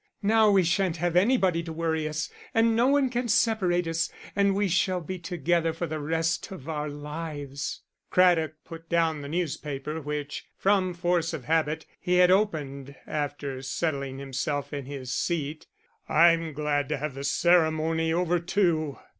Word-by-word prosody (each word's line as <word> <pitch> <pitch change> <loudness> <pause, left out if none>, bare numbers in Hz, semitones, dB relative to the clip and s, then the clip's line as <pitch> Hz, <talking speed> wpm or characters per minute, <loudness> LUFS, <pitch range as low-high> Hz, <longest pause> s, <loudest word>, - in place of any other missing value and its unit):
Now 220 +1 +5
we 195 -2 +5
shan't 175 0 +1
have 175 +1 -1
anybody 190 -4 +3
to 165 -1 -7
worry 160 -1 -1
us, 155 +1 -3 0.2
and 225 0 +4
no 235 +3 +4
one 275 -2 +3
can 245 0 -1
separate 200 -6 +2
us, 165 0 0 0.3
and 200 -1 +3
we 205 0 +1
shall 180 +1 +1
be 180 +2 -6
together 170 -1 0
for 170 +2 -3
the 155 -1 -4
rest 165 +3 -1
of 165 -7 -9
our 150 -2 -3
lives." 145 -1 -5 0.3
Craddock 170 -4 +3
put 165 0 -11
down 165 -3 +1
the 140 - -7
newspaper, 150 -2 -3
which, 145 0 -4
from 190 -2 +2
force 175 -1 0
of 135 - -7
habit, 160 +2 0
he 180 - 0
had 180 0 +6
opened 145 -9 0
after 145 -3 -3
settling 135 -1 -2
himself 140 +2 -3
in 140 -2 -4
his 130 -2 -5
seat. 155 -2 -2 0.4
"I'm 165 0 +4
glad 145 -1 -1
to - - 0
have 150 0 -4
the 135 +1 -7
ceremony 160 0 +2
over 175 +1 +1
too." 170 -5 0
165 Hz, 165 wpm, -27 LUFS, 150-180 Hz, 0.4 s, had